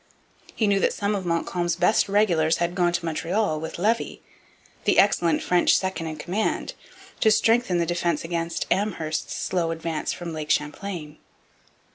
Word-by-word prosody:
He 220 - +1
knew 200 -1 +3
that - - +2
some 205 +1 -1
of 190 -3 -3
Montcalm's 175 +1 -1
best 210 - +2
regulars 175 -6 +3
had 170 0 -1
gone 175 -1 +2
to 175 0 -2
Montreal 165 +1 -1
with 160 - -6
Levis, 220 +6 0 0.7
the - - +3
excellent 175 -4 +3
French 180 -1 +4
second 190 -3 -3
in 155 - -4
command, 195 - -2 0.5
to 220 - +4
strengthen 225 -3 +3
the 170 - +1
defence 175 -2 -1
against 165 0 -2
Amherst's 170 -6 -1
slow 175 -3 -1
advance 165 -1 -3
from 170 -2 -6
Lake 155 -1 -5
Champlain. 150 0 -2
175 Hz, 155 wpm, -24 LUFS, 165-200 Hz, 0.7 s, French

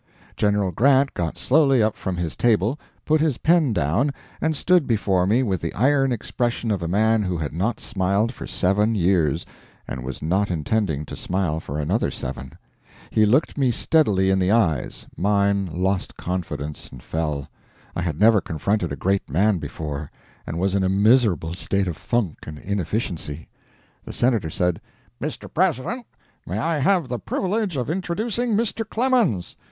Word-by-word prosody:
General 105 -2 +1
Grant 135 - +3
got 85 -2 -3
slowly 135 -4 +4
up 110 0 +1
from 95 -2 -4
his 85 -2 -3
table, 115 +3 +2 0.3
put 155 0 +3
his 155 -6 +1
pen 160 -5 +3
down, 95 - +1 0.3
and 160 -1 +1
stood 175 -1 +3
before 95 -6 +1
me 115 +6 +3
with 95 -7 -1
the 85 - -2
iron 135 +4 +3
expression 120 0 -2
of 100 -4 -1
a 85 - -2
man 110 +5 +3
who 90 -3 -1
had 75 -3 -4
not 100 +9 -1
smiled 100 +3 0
for - - -8
seven 105 +4 +1
years, 85 -5 +2 0.4
and 65 - -5
was 65 0 -5
not 95 +6 0
intending 80 -2 -1
to - - -7
smile 90 -4 -1
for 75 -1 -5
another 90 +10 0
seven. 65 0 -6 0.6
He 110 -1 +4
looked 135 +6 +2
me 135 -2 +3
steadily 105 -8 +2
in 95 - +2
the 90 0 +1
eyes 95 - +1
mine 100 0 +1
lost 95 +3 -1
confidence 85 -5 -4
and 65 -2 -12
fell. 75 -4 -2 0.5
I - - -1
had 85 -3 -2
never 110 -1 +5
confronted 85 +3 -1
a - - -2
great 95 +8 -1
man 95 +6 +2
before, 75 -2 -5 0.4
and 80 - -4
was 95 +2 0
in 100 -1 +2
a 95 - +2
miserable 100 - +3
state 95 +2 -1
of 85 - -2
funk 95 +1 -2
and 75 0 -7
inefficiency. 90 -5 -3 0.5
The - - -8
Senator 115 -9 +1
said: 90 0 -1 0.4
"Mr. - - -4
President, 235 - 0 0.4
may - - -3
I 165 -2 0
have 170 +1 +2
the 125 -1 -3
privilege 195 - -1
of 125 - -2
introducing 210 - -1
Mr. 225 +1 0
Clemens?" 230 - +1
100 Hz, 170 wpm, -23 LUFS, 85-125 Hz, 0.6 s, never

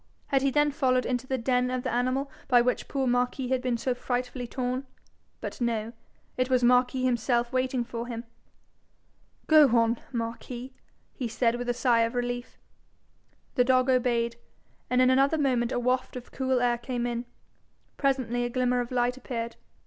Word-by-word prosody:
Had 270 -1 +3
he 275 - +2
then 295 +2 +2
followed 255 -3 +1
into 250 +1 -2
the 265 - 0
den 250 +1 +1
of 255 0 -2
the - - -2
animal 255 +3 0 0.2
by 245 -2 +5
which 250 +1 0
poor 270 -1 -1
Marquis 245 +1 0
had 260 -1 +1
been 250 -2 0
so 255 +2 -1
frightfully 250 0 -3
torn? 255 +2 -3 0.5
But - - -6
no: 230 -1 -1 0.4
it 255 0 +1
was 255 -1 +2
Marquis 250 +1 +3
himself 240 0 +1
waiting 255 -1 0
for 235 0 -6
him! 230 -1 -5 1.2
'Go 310 -2 +7
on, 230 0 +2
Marquis,' 240 +2 -5 0.4
he 250 - -3
said, 230 +1 +1
with 245 0 -4
a 245 - +1
sigh 240 -2 +3
of 230 +2 0
relief. 245 0 -3 1.0
The 250 - +4
dog 255 +1 +3
obeyed, 235 -2 +1 0.5
and 250 0 +4
in 255 - +5
another 275 +4 +3
moment 255 -4 +1
a - - 0
waft 255 +1 0
of 250 -1 -8
cool 260 -2 0
air 240 -1 +2
came 240 0 -3
in. 240 0 -3 0.7
Presently 260 -4 0
a 240 - -1
glimmer 250 0 +1
of 240 -1 -2
light 245 0 0
appeared. 235 -3 -5
250 Hz, 175 wpm, -27 LUFS, 240-260 Hz, 1.2 s, Go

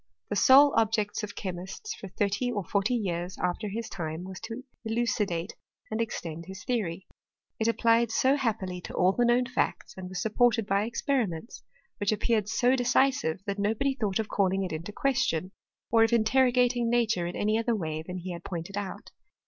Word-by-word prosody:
The - - -1
sole 275 +7 +7
objects 220 -2 +1
of 210 -1 -6
chemists 190 - -5
for 195 - -9
thirty 205 +6 -1
or 205 -4 -2
forty 200 +7 0
years 180 -4 -2
after 180 +4 -1
his 225 +3 -4
time 160 -1 -5
was 190 -1 -8
to 225 +3 -7 0.2
illucidate 220 -6 -1 0.4
and 220 +1 -1
extend 170 -7 -4
his 190 0 -8
theory. 195 -8 -2 0.5
It 220 - +1
applied 230 0 +3 0.2
ao 265 - +6
happily 205 -9 -2
to - - -8
all 180 +1 +4
the 240 +5 +1
known 240 +1 +3
facts, 250 0 -2
and 185 -1 -7
was 185 -1 -4
supported 225 +2 +2
by 200 +1 +1
experiments, 230 - -2 0.4
which 205 -1 +1
appeared 215 -1 +1
so 250 +3 +3
decisive 250 - +2
that 200 -1 -3
no 205 +2 +1
body 275 +4 +1
thought 210 -7 -1
of 220 -2 -1
calling 195 -1 +1
it 185 - -4
in 155 - -3
question, 210 - 0 0.4
or 225 0 +6
of 225 - +3
interro 240 +3 +3
gating 245 -1 +2
nature 225 -7 +1
in 175 - -5
any 215 +2 +1
other 230 0 +1
way 155 -5 -3
than 180 +3 -6
he 180 +1 -5
had 170 0 -7
pointed 175 +2 -5
out. 200 -2 -6
210 Hz, 190 wpm, -28 LUFS, 185-235 Hz, 0.5 s, sole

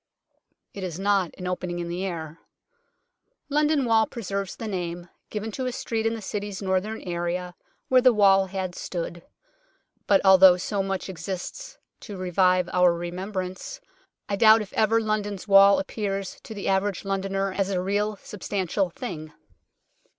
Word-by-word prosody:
It 200 - -7
is 175 -3 -4
not 195 -2 +1
an 180 - -7
opening 180 -1 -3
in 175 -1 -4
the 175 +2 -3
air. 165 -4 -5 1.1
London 295 -1 +2
Wall 225 -1 +3
preserves 200 -4 -4
the 225 - -6
name, 175 -3 -4 0.2
given 215 +1 -4
to 255 +4 -3
a - - -1
street 225 -3 -2
in 225 - -1
the 220 - -8
City's 205 0 -4
northern 195 +3 -1
area 175 0 -3 0.3
where 255 -1 +5
the 255 0 +6
wall 195 -3 +4
had 185 -1 -4
stood. 175 -1 -5 0.9
But 195 -1 +5
although 190 -1 +8
so 200 +2 -2
much 195 -1 -3
exists 185 0 -6 0.2
to 205 -4 -8
revive 185 0 +2
our 180 -1 +5
remembrance, 185 - -5 0.5
I 200 - -1
doubt 220 +1 +6
if 205 - -14
ever 220 +1 +3
London's 210 -2 -2
wall 195 0 +7
appears 195 -1 -3
to 220 - -8
the 200 - -5
average 195 0 0
Londoner 195 0 -1
as 195 0 -1
a 190 -2 0
real, 205 +3 0
substantial 195 -1 -2
thing. 160 -6 -7
195 Hz, 155 wpm, -25 LUFS, 180-210 Hz, 1.1 s, although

